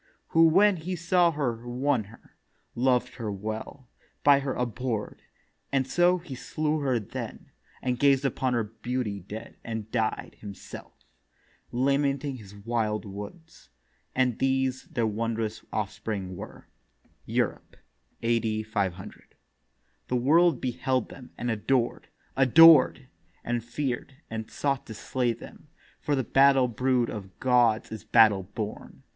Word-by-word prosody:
Who 165 Hz, 0 st, +6 dB
when 195 Hz, +4 st, +5 dB
he 180 Hz, +3 st, -4 dB
saw 175 Hz, +1 st, +3 dB
her 140 Hz, -7 st, -1 dB
won 125 Hz, -2 st, 0 dB
her; 110 Hz, +4 st, -18 dB, 0.4 s
loved 125 Hz, -1 st, +1 dB
her 110 Hz, -4 st, -3 dB
well; 110 Hz, +6 st, -6 dB, 0.4 s
By 140 Hz, -1 st, +6 dB
her 135 Hz, -1 st, -3 dB
abhor'd: 120 Hz, -2 st, -3 dB, 0.5 s
and 135 Hz, -1 st, +2 dB
so 175 Hz, +6 st, +3 dB
he 165 Hz, -5 st, -9 dB
slew 155 Hz, +4 st, -2 dB
her 135 Hz, -4 st, +1 dB
then, 105 Hz, -, -7 dB, 0.3 s
And 125 Hz, -1 st, -1 dB
gazed 140 Hz, -1 st, +4 dB
upon 130 Hz, -1 st, 0 dB
her 115 Hz, -, +1 dB
beauty 110 Hz, 0 st, -4 dB
dead, 105 Hz, +5 st, -9 dB
and 110 Hz, -2 st, -5 dB
died 110 Hz, -2 st, -2 dB
Himself, 100 Hz, -2 st, -11 dB, 0.7 s
lamenting 140 Hz, +1 st, 0 dB
his 105 Hz, -3 st, -13 dB
wild 110 Hz, 0 st, -2 dB
woods. 105 Hz, -, -10 dB, 0.5 s
And 125 Hz, -3 st, +1 dB
these 130 Hz, -1 st, 0 dB
Their 120 Hz, -4 st, -1 dB
wondrous 110 Hz, 0 st, -2 dB
offspring 100 Hz, -2 st, -3 dB
were. -, -, -10 dB, 0.6 s
Europe, -, -, -2 dB, 0.5 s
A.D. 115 Hz, -2 st, +1 dB
500. 100 Hz, -3 st, -4 dB, 0.7 s
The 125 Hz, -, -1 dB
World 155 Hz, +4 st, +4 dB
beheld 130 Hz, 0 st, -1 dB
them 125 Hz, -2 st, -12 dB
and 120 Hz, 0 st, -2 dB
adored—adored, 135 Hz, +5 st, +4 dB, 0.4 s
And 120 Hz, -1 st, -2 dB
fear'd, 130 Hz, +1 st, -4 dB, 0.2 s
and 110 Hz, -1 st, -5 dB
sought 140 Hz, -2 st, -2 dB
to 110 Hz, -, -7 dB
slay 125 Hz, +1 st, -1 dB
them; 120 Hz, +5 st, -13 dB, 0.3 s
for 145 Hz, -, 0 dB
The 130 Hz, -, 0 dB
battle 135 Hz, +1 st, +5 dB
brood 125 Hz, +1 st, +1 dB
of 95 Hz, -4 st, -8 dB
gods 120 Hz, -4 st, +3 dB
is 110 Hz, -, -7 dB
battle 110 Hz, -4 st, +5 dB
born. 105 Hz, +3 st, -7 dB
125 Hz, 130 wpm, -27 LUFS, 110-135 Hz, 0.7 s, Who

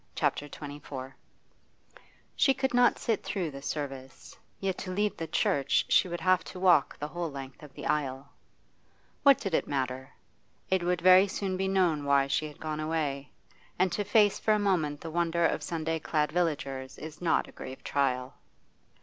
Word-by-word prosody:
CHAPTER 145 Hz, -, 0 dB
XXIV 140 Hz, -3 st, -8 dB, 1.2 s
She 270 Hz, -, +4 dB
could 265 Hz, -1 st, -1 dB
not 245 Hz, 0 st, +4 dB
sit 225 Hz, -3 st, -1 dB
through 180 Hz, -6 st, -2 dB
the 140 Hz, 0 st, -9 dB
service, 135 Hz, -3 st, -6 dB, 0.2 s
yet 190 Hz, -1 st, -1 dB
to 190 Hz, -, -6 dB
leave 205 Hz, +2 st, 0 dB
the 165 Hz, -, -5 dB
church 140 Hz, -3 st, +1 dB
she -, -, +4 dB
would 175 Hz, -1 st, -5 dB
have 185 Hz, +1 st, +3 dB
to 185 Hz, -, -8 dB
walk 180 Hz, -6 st, +4 dB
the 150 Hz, -, -5 dB
whole 170 Hz, +1 st, -3 dB
length 135 Hz, -2 st, -9 dB
of 150 Hz, -2 st, -12 dB
the -, -, -8 dB
aisle. 135 Hz, -2 st, -1 dB, 0.9 s
What 280 Hz, -1 st, +7 dB
did 195 Hz, -5 st, -4 dB
it -, -, +1 dB
matter? 130 Hz, -1 st, -2 dB, 0.6 s
It 190 Hz, -1 st, +3 dB
would 175 Hz, 0 st, 0 dB
very 185 Hz, +2 st, +7 dB
soon 195 Hz, -1 st, -3 dB
be 190 Hz, +1 st, -1 dB
known 180 Hz, -6 st, +2 dB
why 140 Hz, -1 st, +3 dB
she 140 Hz, +3 st, -1 dB
had 150 Hz, -, -13 dB
gone 155 Hz, -1 st, -4 dB
away, 150 Hz, -4 st, -2 dB, 0.5 s
and 185 Hz, 0 st, +2 dB
to 205 Hz, +4 st, -1 dB
face 205 Hz, -1 st, +3 dB
for 215 Hz, -1 st, +3 dB
a -, -, +2 dB
moment 170 Hz, -8 st, 0 dB
the 165 Hz, -, -6 dB
wonder 170 Hz, 0 st, +1 dB
of -, -, +1 dB
Sunday 165 Hz, -1 st, -2 dB
clad 150 Hz, -1 st, 0 dB
villagers 140 Hz, -6 st, -2 dB
is 155 Hz, +2 st, -9 dB
not 170 Hz, -, +1 dB
a -, -, -13 dB
grave 130 Hz, +1 st, -9 dB
trial. 130 Hz, -2 st, 0 dB
160 Hz, 180 wpm, -29 LUFS, 140-185 Hz, 1.2 s, What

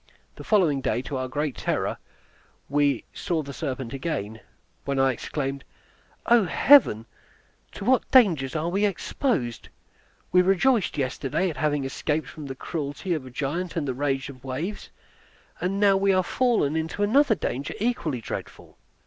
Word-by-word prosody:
The -, -, -10 dB
following 170 Hz, -10 st, +2 dB
day, 125 Hz, -, -1 dB
to 135 Hz, -, -4 dB
our 130 Hz, 0 st, -2 dB
great 145 Hz, +2 st, -2 dB
terror, -, -, -1 dB, 0.7 s
we 145 Hz, 0 st, +1 dB
saw 165 Hz, -3 st, -2 dB
the 140 Hz, 0 st, -8 dB
serpent 135 Hz, -5 st, -4 dB
again, 130 Hz, -7 st, -4 dB, 0.4 s
when 140 Hz, -1 st, -2 dB
I 135 Hz, 0 st, +4 dB
exclaimed, 140 Hz, +2 st, -4 dB, 0.6 s
"O 235 Hz, -4 st, +5 dB
Heaven, 175 Hz, -, +5 dB, 0.7 s
to -, -, -7 dB
what 260 Hz, +2 st, +2 dB
dangers 165 Hz, -, +4 dB
are 160 Hz, +2 st, -1 dB
we 195 Hz, +4 st, 0 dB
exposed! 200 Hz, -, -1 dB, 0.6 s
We 180 Hz, -, +6 dB
rejoiced 195 Hz, -, +2 dB
yesterday 140 Hz, +6 st, -1 dB
at -, -, -10 dB
having 150 Hz, -2 st, 0 dB
escaped 150 Hz, +3 st, -2 dB
from 150 Hz, -3 st, -9 dB
the 135 Hz, -, -6 dB
cruelty 150 Hz, +5 st, -4 dB
of 145 Hz, -5 st, -4 dB
a -, -, -8 dB
giant 150 Hz, +8 st, -3 dB
and 155 Hz, -4 st, -1 dB
the 130 Hz, -, -1 dB
rage 135 Hz, 0 st, -1 dB
of 130 Hz, -3 st, -11 dB
the 135 Hz, -, -12 dB
waves, 165 Hz, +11 st, -4 dB, 0.7 s
now 195 Hz, +2 st, +3 dB
are 195 Hz, -, +3 dB
we 195 Hz, -1 st, +3 dB
fallen 225 Hz, -, +1 dB
into 160 Hz, +5 st, -2 dB
another 235 Hz, +3 st, +4 dB
danger 140 Hz, -6 st, -3 dB
equally 185 Hz, -, -1 dB
dreadful." -, -, -8 dB
155 Hz, 155 wpm, -25 LUFS, 135-195 Hz, 0.7 s, We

